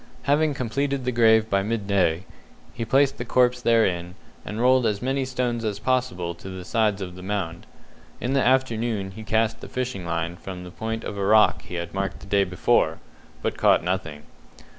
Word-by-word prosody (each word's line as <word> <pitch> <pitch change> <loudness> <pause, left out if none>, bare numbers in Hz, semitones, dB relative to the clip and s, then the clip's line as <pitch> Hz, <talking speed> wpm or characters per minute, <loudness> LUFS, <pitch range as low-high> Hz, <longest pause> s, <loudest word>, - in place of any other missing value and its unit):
Having 150 +1 +2
completed 135 +2 -2
the 125 - +1
grave 110 -2 +4
by 100 -3 +1
midday, 100 -5 0 0.5
he 120 - -4
placed 135 +4 +2
the - - -2
corpse 125 0 +2
therein, 90 -7 +1 0.3
and 105 - -6
rolled 125 0 +4
as 105 -2 -1
many 135 +2 -1
stones 125 -2 -2
as 105 -2 -2
possible 120 -8 -1
to 85 +3 -10
the 95 -1 -7
sides 105 -3 +1
of 90 -1 -7
the 90 - -10
mound. 95 -3 -4 0.5
In 125 +2 -1
the 135 - +3
afternoon 115 -6 +1
he 110 - -9
cast 110 +1 0
the - - -9
fishing 125 -7 -3
line 85 0 -3
from 90 -1 -8
the 90 - -9
point 110 +3 -4
of 100 - -5
a - - -1
rock 105 +2 +4
he 90 - -9
had 85 -1 -5
marked 100 0 -3
the - - -10
day 100 0 +2
before, 90 -2 +1 0.5
but - - -2
caught - - +4
nothing. 80 -5 -3
110 Hz, 190 wpm, -24 LUFS, 95-125 Hz, 0.5 s, grave